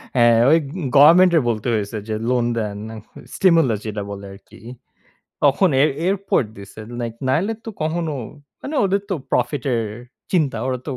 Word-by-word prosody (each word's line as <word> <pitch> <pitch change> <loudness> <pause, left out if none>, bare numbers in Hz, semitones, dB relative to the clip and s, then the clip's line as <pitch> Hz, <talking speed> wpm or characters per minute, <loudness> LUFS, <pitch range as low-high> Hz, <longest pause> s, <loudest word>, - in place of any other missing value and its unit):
হ্যাঁ, 120 -2 +5
ওই 160 - +6
অগ - - -8 0.3
গভেরমেন্টের 170 +2 +7
বলতে 110 +1 -2
হয়েছে 105 0 -2
যে 110 - -1
লোন 125 -2 +1
দেন, 105 -2 -3 0.6
স্টিমুলে 165 - +3
যেটা 105 -1 -4
বলে 100 0 -8
আরকি। 100 - -16 0.8
তখন 165 +6 +4
এর 150 - +4 0.2
এরপর 195 -4 +1
দিছে 100 +2 -11 0.2
নাই 120 -1 -2 0.2
নাইলে 190 +12 +1
তো 225 - -5
কখনো 160 0 -1 0.5
মানে 300 - -5
ওদের 195 +1 +1
তো - - 0 0.2
প্রফিটের 125 -5 0 0.5
চিন্তা। 150 -10 +1
ওরা 130 -1 -2
তো - - -2
135 Hz, 155 wpm, -20 LUFS, 115-170 Hz, 0.8 s, গভেরমেন্টের